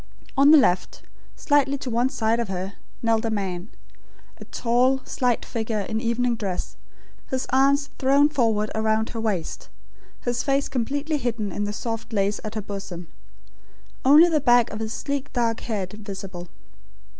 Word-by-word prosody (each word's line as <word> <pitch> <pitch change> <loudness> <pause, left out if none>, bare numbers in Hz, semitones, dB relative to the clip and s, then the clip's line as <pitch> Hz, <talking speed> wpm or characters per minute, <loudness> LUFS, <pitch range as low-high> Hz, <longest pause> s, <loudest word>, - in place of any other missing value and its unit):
On 275 +1 +6
the 310 - +9
left, 190 -10 +1 0.3
slightly 280 -1 +2
to 255 -2 -5
one 240 +3 +2
side 230 -4 0
of 235 - -1
her, 190 +1 -4 0.3
knelt 225 -1 +2
a 225 - 0
man, 190 -2 -3 0.7
a - - -9
tall 250 +3 +2
slight 245 -2 0
figure 220 -2 -2
in 220 +3 -3
evening 235 +1 +1
dress, 195 -5 -4 0.5
his 260 -1 -1
arms 280 +2 +3
thrown 275 +2 +5
forward 225 -8 +1
around 220 0 +1
her 225 - -5
waist; 200 -7 -3 0.5
his 240 0 -1
face 275 0 +1
completely 280 +5 -1
hidden 235 -6 -2
in 205 +3 -2
the 205 - -2
soft 225 +1 -5
lace 200 0 +1
at 215 +1 -6
her 215 - -3
bosom; 190 -4 -7 0.9
only 295 +6 +8
the 315 -3 +1
back 240 -2 +4
of 215 - -5
his 220 0 -3
sleek 280 +3 -3
dark 230 -2 0
head, 200 -5 -4
visible. 195 -4 -7
230 Hz, 160 wpm, -24 LUFS, 210-265 Hz, 0.9 s, the